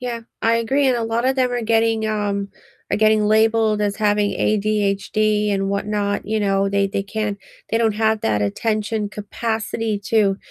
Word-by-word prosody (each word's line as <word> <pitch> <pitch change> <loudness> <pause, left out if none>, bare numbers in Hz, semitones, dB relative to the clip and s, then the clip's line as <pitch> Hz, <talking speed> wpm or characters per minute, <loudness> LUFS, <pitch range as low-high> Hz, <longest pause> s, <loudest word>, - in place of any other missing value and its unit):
Yeah, 240 -2 -4 0.2
I 230 +1 +2
agree, 265 +5 +1
and 255 -2 +3
a 235 - -2
lotta 235 +4 0
them 255 -2 +1
are 245 - -1
getting, 225 -1 +1
um, 205 -2 -2 0.4
are - - +1
getting 215 0 +3
labeled 220 0 +3
as 205 -1 -1
having 210 -1 +1
ADHD 210 0 0
and 195 -1 0
whatnot, 205 0 -1
you 215 0 -1
know, 195 -1 +1
they 200 0 +2
they 195 0 -2
can't 210 0 -3 0.3
they 225 - +1
don't 225 -2 +2
have 220 0 +1
that 105 -1 +1
attention 215 - -1
capacity 220 0 -3
to 205 -4 +2
215 Hz, 170 wpm, -20 LUFS, 205-225 Hz, 0.4 s, and